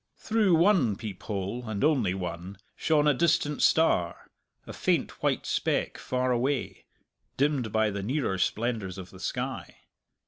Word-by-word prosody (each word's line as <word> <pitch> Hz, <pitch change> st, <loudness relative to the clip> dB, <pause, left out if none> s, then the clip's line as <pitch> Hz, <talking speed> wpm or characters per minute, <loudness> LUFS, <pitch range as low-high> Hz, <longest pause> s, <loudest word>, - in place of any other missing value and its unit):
Through 215 Hz, -5 st, +2 dB
one 165 Hz, -, +3 dB
peep 105 Hz, -3 st, -7 dB
hole, 105 Hz, +3 st, -4 dB
and 105 Hz, -2 st, -2 dB
only 130 Hz, -, +2 dB
one, 90 Hz, +1 st, -6 dB, 0.2 s
shone 150 Hz, -2 st, +2 dB
a 150 Hz, -, +5 dB
distant 155 Hz, -1 st, +1 dB
star, 90 Hz, -, +2 dB, 0.3 s
a -, -, -8 dB
faint -, -, -1 dB
white -, -, 0 dB
speck -, -, -1 dB
far 130 Hz, 0 st, -1 dB
away, 125 Hz, +2 st, -1 dB, 0.5 s
dimmed 135 Hz, -5 st, +1 dB
by 110 Hz, 0 st, +2 dB
the 100 Hz, 0 st, -4 dB
nearer 110 Hz, -3 st, -1 dB
splendours 105 Hz, -2 st, -1 dB
of 90 Hz, -1 st, -9 dB
the 95 Hz, -, -13 dB
sky. 95 Hz, -, -4 dB
120 Hz, 145 wpm, -28 LUFS, 95-150 Hz, 0.5 s, a